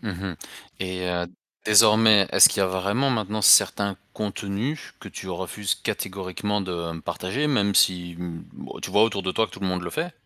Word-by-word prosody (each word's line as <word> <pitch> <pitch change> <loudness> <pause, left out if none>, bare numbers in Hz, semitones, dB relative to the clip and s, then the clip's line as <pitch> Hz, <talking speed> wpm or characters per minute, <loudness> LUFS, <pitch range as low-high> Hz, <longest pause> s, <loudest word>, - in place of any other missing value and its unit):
Mmh 110 - -6
mh 90 -1 -6 0.4
et 95 -1 -4
heu, 90 0 -2 0.4
désormais, 110 -1 +6
est-ce - - +8
qu'il - - -2
y 95 - +3
a - - +1
vraiment 100 +9 -1
maintenant 110 -3 -2
certains 100 0 +5 0.2
contenus 105 +7 -5
que - - -10
tu 95 - -9
refuses 95 +2 -3
catégoriquement 95 +2 -4
de 85 -3 -5
partager, 95 - -3
même 100 -9 +1
si, 90 -2 +2
mmh, 85 -2 -7
bah, - - -10
tu - - -5
vois 105 - +4
autour 105 -3 -2
de 95 - -2
toi 110 +3 +1
que - - -21
tout - - -11
le 95 - -2
monde 90 -1 -2
le 85 - -6
fait? 165 +3 -4
100 Hz, 200 wpm, -24 LUFS, 90-105 Hz, 0.4 s, est-ce